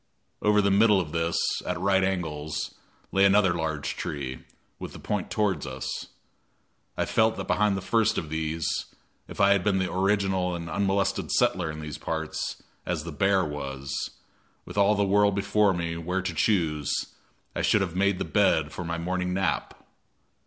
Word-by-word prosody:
Over 105 Hz, 0 st, +4 dB
the 100 Hz, -, +3 dB
middle 105 Hz, 0 st, +5 dB
of 80 Hz, -5 st, -3 dB
this, 85 Hz, +1 st, 0 dB, 0.3 s
at 90 Hz, -1 st, -3 dB
right 95 Hz, +1 st, +3 dB
angles, 80 Hz, -5 st, -2 dB, 0.4 s
lay 95 Hz, -, +3 dB
another 100 Hz, -2 st, +5 dB
large 80 Hz, -5 st, -2 dB
tree, 65 Hz, -3 st, -4 dB, 0.4 s
with -, -, -7 dB
the -, -, -9 dB
point -, -, -2 dB
toward 100 Hz, -10 st, 0 dB
us. 65 Hz, 0 st, -5 dB, 0.9 s
I -, -, +1 dB
felt 110 Hz, 0 st, +2 dB
that -, -, -4 dB
behind 105 Hz, -2 st, +2 dB
the 95 Hz, -, -5 dB
first 115 Hz, +1 st, +2 dB
of 80 Hz, -, -3 dB
these, 80 Hz, 0 st, -2 dB, 0.6 s
if -, -, -10 dB
I 100 Hz, 0 st, +5 dB
had 100 Hz, -2 st, +3 dB
been 100 Hz, -1 st, +2 dB
the 95 Hz, -1 st, -1 dB
original 95 Hz, -1 st, +1 dB
and 85 Hz, -1 st, -6 dB
unmolested 100 Hz, -1 st, 0 dB
settler 90 Hz, -3 st, +2 dB
in 75 Hz, 0 st, -6 dB
these 75 Hz, -2 st, -6 dB
parts, 80 Hz, -1 st, -4 dB, 0.2 s
as 85 Hz, -4 st, -2 dB
the 85 Hz, -, -6 dB
bear 95 Hz, +4 st, +2 dB
was, 70 Hz, -2 st, -5 dB, 0.7 s
with -, -, -9 dB
all 100 Hz, +1 st, +4 dB
the 100 Hz, -, +2 dB
world 100 Hz, 0 st, +3 dB
before 100 Hz, +1 st, +3 dB
me 85 Hz, -2 st, -2 dB
where 90 Hz, +3 st, -2 dB
to -, -, -2 dB
choose, 80 Hz, -9 st, +1 dB, 0.6 s
I -, -, -1 dB
should 110 Hz, -, +3 dB
have 90 Hz, -3 st, -2 dB
made 100 Hz, 0 st, +2 dB
the -, -, -2 dB
bed 80 Hz, -1 st, +2 dB
for 90 Hz, -, -5 dB
my 85 Hz, 0 st, -3 dB
morning 90 Hz, +1 st, -2 dB
nap. 95 Hz, -3 st, -2 dB
90 Hz, 175 wpm, -27 LUFS, 80-100 Hz, 0.9 s, middle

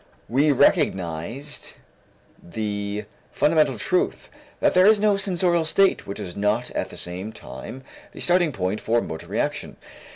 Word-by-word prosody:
We 145 Hz, +5 st, +3 dB
recognized 115 Hz, -, 0 dB, 0.7 s
the 105 Hz, +1 st, -4 dB, 0.2 s
fundamental 150 Hz, -4 st, +2 dB
truth 180 Hz, -, 0 dB, 0.3 s
that -, -, +3 dB
there 185 Hz, +2 st, +6 dB
is 215 Hz, -1 st, +6 dB
no 210 Hz, -1 st, +3 dB
sensorial 180 Hz, -3 st, +2 dB
state 195 Hz, +5 st, +2 dB
which 100 Hz, -, -6 dB
is 90 Hz, -4 st, -6 dB
not 105 Hz, +4 st, 0 dB
at -, -, -3 dB
the -, -, -10 dB
same 90 Hz, +5 st, -4 dB
time 130 Hz, +4 st, -9 dB, 0.3 s
the -, -, -12 dB
starting 175 Hz, -2 st, +3 dB
point 95 Hz, -2 st, -2 dB
for 115 Hz, +1 st, +2 dB
motor 80 Hz, -8 st, -6 dB
reaction. -, -, -3 dB
120 Hz, 140 wpm, -24 LUFS, 100-170 Hz, 0.7 s, there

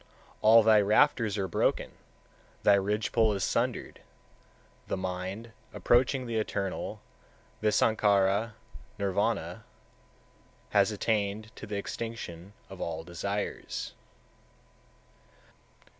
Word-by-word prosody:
All 110 Hz, +1 st, +7 dB
thy 110 Hz, -1 st, +6 dB
rafters 110 Hz, 0 st, +3 dB
are 95 Hz, -1 st, -1 dB
broken, 85 Hz, -, 0 dB, 0.7 s
thy 105 Hz, -, +6 dB
ridge 100 Hz, +1 st, 0 dB
pole 110 Hz, -2 st, +3 dB
is 100 Hz, -2 st, -2 dB
sundered; -, -, -1 dB, 0.9 s
the -, -, -2 dB
mind, 95 Hz, +5 st, -5 dB, 0.2 s
approaching 130 Hz, +2 st, +2 dB
the 115 Hz, -2 st, -2 dB
Eternal 100 Hz, -3 st, -3 dB, 0.6 s
(visankhara, 105 Hz, -1 st, +2 dB, 0.4 s
nirvana), 100 Hz, 0 st, -1 dB, 1.1 s
has -, -, +4 dB
attained 105 Hz, 0 st, -1 dB
to 105 Hz, -, -9 dB
the 105 Hz, -1 st, -3 dB
extinction 100 Hz, -4 st, -6 dB
of 95 Hz, -1 st, -10 dB
all 80 Hz, -1 st, -3 dB
desires. 100 Hz, +4 st, -4 dB
105 Hz, 95 wpm, -29 LUFS, 95-110 Hz, 1.1 s, All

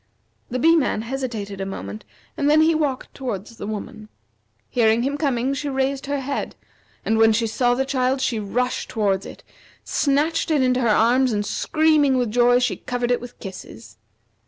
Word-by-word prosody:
The 255 Hz, -, -2 dB
Bee 330 Hz, +6 st, +5 dB
man 265 Hz, -8 st, +1 dB
hesitated 230 Hz, -6 st, -4 dB
a -, -, -2 dB
moment, 100 Hz, -, -7 dB, 0.3 s
and 285 Hz, -, +1 dB
then 305 Hz, +1 st, +5 dB
he 320 Hz, +1 st, +4 dB
walked 290 Hz, -5 st, -2 dB
toward 225 Hz, -8 st, -4 dB
the 220 Hz, -3 st, -9 dB
woman. 215 Hz, 0 st, -7 dB, 0.6 s
Hearing 230 Hz, -1 st, +2 dB
him 280 Hz, +2 st, -1 dB
coming, 270 Hz, -3 st, 0 dB
she 285 Hz, +1 st, -3 dB
raised 270 Hz, 0 st, -1 dB
her 285 Hz, -1 st, -1 dB
head, 280 Hz, +1 st, -4 dB, 0.5 s
and 220 Hz, 0 st, +1 dB
when 225 Hz, 0 st, +6 dB
she 230 Hz, +1 st, +1 dB
saw 245 Hz, +2 st, +1 dB
the 265 Hz, +2 st, 0 dB
child 260 Hz, 0 st, 0 dB
she 260 Hz, -4 st, 0 dB
rushed 245 Hz, +5 st, -2 dB
towards 200 Hz, -3 st, 0 dB
it, -, -, -12 dB, 0.4 s
snatched 305 Hz, +4 st, 0 dB
it 300 Hz, -4 st, +2 dB
into 255 Hz, 0 st, +2 dB
her 235 Hz, -, +1 dB
arms, 245 Hz, +4 st, +3 dB
and 205 Hz, -1 st, -1 dB
screaming 305 Hz, +1 st, +2 dB
with 245 Hz, -4 st, 0 dB
joy 245 Hz, +1 st, +4 dB
she 250 Hz, 0 st, 0 dB
covered 245 Hz, -1 st, -2 dB
it 245 Hz, -, +1 dB
with 245 Hz, 0 st, -11 dB
kisses. 115 Hz, -, -10 dB
250 Hz, 180 wpm, -22 LUFS, 220-275 Hz, 0.6 s, when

